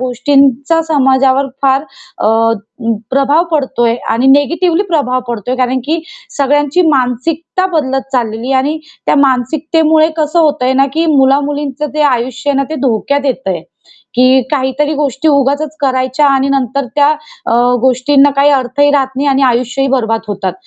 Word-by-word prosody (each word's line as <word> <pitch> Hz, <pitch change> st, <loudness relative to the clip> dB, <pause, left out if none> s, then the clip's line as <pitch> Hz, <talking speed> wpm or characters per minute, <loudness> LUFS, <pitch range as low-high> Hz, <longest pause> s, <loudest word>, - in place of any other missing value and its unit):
गोष्टींचा 275 Hz, +4 st, +1 dB
समाजावर 270 Hz, -2 st, +2 dB, 0.2 s
फार 270 Hz, 0 st, +2 dB, 0.4 s
अ, -, -, -1 dB, 0.6 s
अं, 230 Hz, -1 st, -1 dB
प्रभाव 275 Hz, +5 st, +2 dB
पडतोय 265 Hz, -6 st, 0 dB, 0.2 s
आणि 235 Hz, +4 st, +1 dB
निगेटिव्हली 335 Hz, +5 st, 0 dB
प्रभाव 255 Hz, -5 st, 0 dB
पडतोय. 240 Hz, +2 st, -3 dB
कारण, 255 Hz, 0 st, 0 dB
की 320 Hz, +3 st, -2 dB, 0.3 s
सगळ्यांची 290 Hz, +4 st, +1 dB
मानसिकता 295 Hz, +7 st, -1 dB
बदलत 270 Hz, -3 st, -1 dB
चाललेली 235 Hz, 0 st, -2 dB
आहे 265 Hz, -, +3 dB
आणि 295 Hz, +4 st, -1 dB, 0.3 s
त्या -, -, +3 dB
मानसिकतेमुळे 310 Hz, +4 st, +2 dB
कसं 310 Hz, +2 st, 0 dB
होतंय 290 Hz, -5 st, +1 dB
ना, 270 Hz, +1 st, +3 dB
की 325 Hz, +3 st, 0 dB
मुला-मुलींचं 285 Hz, +1 st, 0 dB
जे 305 Hz, -, +1 dB
आयुष्य 260 Hz, 0 st, -1 dB
आहे 280 Hz, -, 0 dB
ना 275 Hz, -, +1 dB
ते -, -, -3 dB
धोक्यात 275 Hz, +5 st, -1 dB
येत 265 Hz, -5 st, -2 dB
आहे. 175 Hz, -4 st, -2 dB, 0.5 s
की 255 Hz, +1 st, +4 dB
काहीतरी 290 Hz, +2 st, -1 dB
गोष्टी 285 Hz, 0 st, -1 dB
उगाचच 285 Hz, +1 st, 0 dB
करायच्या 260 Hz, +1 st, 0 dB
आणि 275 Hz, 0 st, +1 dB
नंतर 275 Hz, 0 st, -1 dB
त्या 290 Hz, -1 st, +3 dB, 0.4 s
अ, -, -, 0 dB, 0.3 s
गोष्टींना 275 Hz, +3 st, +3 dB
काही 280 Hz, +1 st, +4 dB
अर्थही 280 Hz, +1 st, +1 dB
राहत 275 Hz, -2 st, +1 dB
नाही 280 Hz, +2 st, -1 dB
आणि 275 Hz, 0 st, +1 dB
आयुष्यही 255 Hz, +2 st, 0 dB
बरबाद 225 Hz, -4 st, 0 dB
होतात. 195 Hz, -2 st, -3 dB
275 Hz, 150 wpm, -12 LUFS, 255-290 Hz, 0.6 s, की